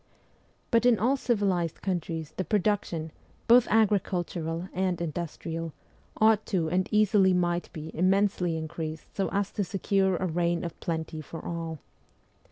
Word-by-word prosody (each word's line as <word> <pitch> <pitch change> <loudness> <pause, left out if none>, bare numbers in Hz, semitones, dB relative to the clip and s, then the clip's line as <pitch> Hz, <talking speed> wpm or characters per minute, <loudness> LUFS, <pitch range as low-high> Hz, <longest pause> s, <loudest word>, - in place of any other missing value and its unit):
But 230 -1 +4
in 240 -2 +5
all 250 +6 +2
civilized 200 - 0
countries 165 -4 -3
the 185 - -1
production, 185 -4 0 0.4
both 240 +1 +7
agricultural 180 -5 0
and 185 -1 0
industrial, 165 0 -4 0.4
ought 220 -1 +4
to 170 -5 0
and 185 +1 +1
easily 210 -3 +4
might 175 -1 0
be 155 0 -8
immensely 185 -1 +2
increased 160 0 -6
so 195 - 0
as 200 0 0
to 205 - -1
secure 195 0 +1
a 185 - -1
reign 170 0 0
of 170 -2 -6
plenty 160 -1 -3
for 155 +2 -9
all. 165 -1 -4
180 Hz, 140 wpm, -28 LUFS, 165-200 Hz, 0.4 s, both